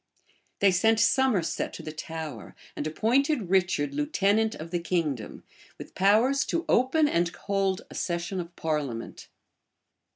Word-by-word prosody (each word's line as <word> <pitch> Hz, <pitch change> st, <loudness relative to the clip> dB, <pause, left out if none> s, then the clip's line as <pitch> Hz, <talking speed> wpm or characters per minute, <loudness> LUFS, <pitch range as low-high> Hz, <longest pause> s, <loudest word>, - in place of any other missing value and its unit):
They 200 Hz, -1 st, +6 dB
sent 220 Hz, +5 st, +3 dB
Somerset 230 Hz, -6 st, +1 dB
to -, -, -8 dB
the 155 Hz, -, -6 dB
Tower, 155 Hz, -6 st, -7 dB, 0.2 s
and 150 Hz, -, -3 dB
appointed 230 Hz, -, +1 dB
Richard 175 Hz, -7 st, +1 dB
lieutenant 200 Hz, +9 st, +1 dB
of 165 Hz, +2 st, -8 dB
the 175 Hz, -, 0 dB
kingdom, 165 Hz, -9 st, -2 dB, 0.3 s
with -, -, -10 dB
powers 225 Hz, +8 st, +3 dB
to 335 Hz, 0 st, -2 dB
open 265 Hz, +5 st, +3 dB
and 170 Hz, -9 st, +1 dB
hold 195 Hz, +1 st, -1 dB
a -, -, -13 dB
session 175 Hz, +2 st, -3 dB
of 170 Hz, 0 st, -7 dB
parliament. 145 Hz, -8 st, -4 dB
185 Hz, 135 wpm, -27 LUFS, 160-220 Hz, 0.3 s, They